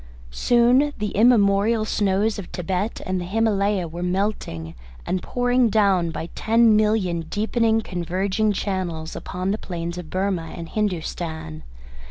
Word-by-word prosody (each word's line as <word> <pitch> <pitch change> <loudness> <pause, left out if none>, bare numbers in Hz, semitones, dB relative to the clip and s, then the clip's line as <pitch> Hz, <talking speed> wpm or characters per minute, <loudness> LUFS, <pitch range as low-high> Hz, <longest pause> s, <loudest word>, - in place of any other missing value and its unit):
Soon 245 - +3
the 210 -1 -2
immemorial 215 -1 +4
snows 205 +1 +1
of 195 - -7
Thibet 185 +4 -3
and 185 -1 -1
the - - -4
Himalaya 200 -2 +1
were 170 +2 -7
melting 180 - -2 0.3
and 185 - -1
pouring 245 -1 +1
down 195 -5 +3
by 165 +1 -5
ten 225 0 +4
million 210 -5 +1
deepening 225 +1 +1
converging 190 +3 -1
channels 185 -5 -3
upon 185 +2 -3
the 215 - -2
plains 170 -1 -5
of 170 -3 -9
Burmah 185 -4 -2
and 165 -1 -7
Hindostan. 165 - -3
195 Hz, 135 wpm, -23 LUFS, 175-220 Hz, 0.3 s, immemorial